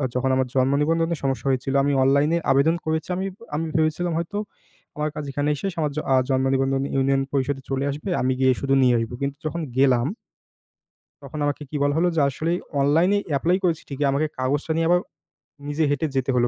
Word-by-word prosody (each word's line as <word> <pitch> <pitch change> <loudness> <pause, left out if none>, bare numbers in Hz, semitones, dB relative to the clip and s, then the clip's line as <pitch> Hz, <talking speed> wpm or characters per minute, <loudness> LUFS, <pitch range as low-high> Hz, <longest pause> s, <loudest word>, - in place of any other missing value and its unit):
যখন 130 +1 +1
আমার 130 -1 +1
জন্ম 130 +1 +3
নিবন্ধনের 165 +1 +1
সমস্যা 135 0 -1
হয়েছিল, 135 +1 -1
আমি 145 - +1
অনলাইনে 140 +5 +3
আবেদন 140 +5 +3
করেছি। 160 +2 -2
আমি, 190 - -2 0.3
আমি 165 +2 -1
ভেবেছিলাম 160 +2 +1
হয়তো 170 +5 -3 0.6
আমার 150 0 -1
কাজ 150 - -4
এখানে 145 +2 -1
শেষ। 195 -2 -2
আমার 150 -2 0
জ - - -8 0.2
আ - - +5
জন্ম 130 0 +2
নিবন্ধন 135 0 +1
ইউনিয়ন 135 0 +2
পরিষদে 135 0 -1
চলে 135 +1 -1
আসবে। 150 +7 -6
আমি 130 +1 +1
গিয়ে 130 -1 +4
শুধু 135 0 +1
নিয়ে 125 -2 +4
আসব। 115 0 -3
কিন্তু 140 +1 -2
যখন 170 +2 -2 0.2
গেলাম 130 -2 +4 1.2
তখন 155 - -7
আমাকে 145 +1 -2
কি - - -6
বলা 145 0 +2
হলো? 175 +2 +3
যে, - - +2
আসলে 155 +5 -2 0.3
অনলাইনে 165 +8 +3 0.2
এপ্লাই 175 +6 +2
করেছি 170 -3 0
ঠিকই, 140 +1 -1
আমাকে 150 +3 +1
কাগজটা 140 +5 -1
নিয়ে 165 0 +1
আবার 175 0 +5 0.7
নিজে 150 +2 0
হেঁটে 145 +3 0
যেতে 135 0 +1
হলো, 120 0 +3
145 Hz, 195 wpm, -23 LUFS, 135-160 Hz, 1.2 s, আ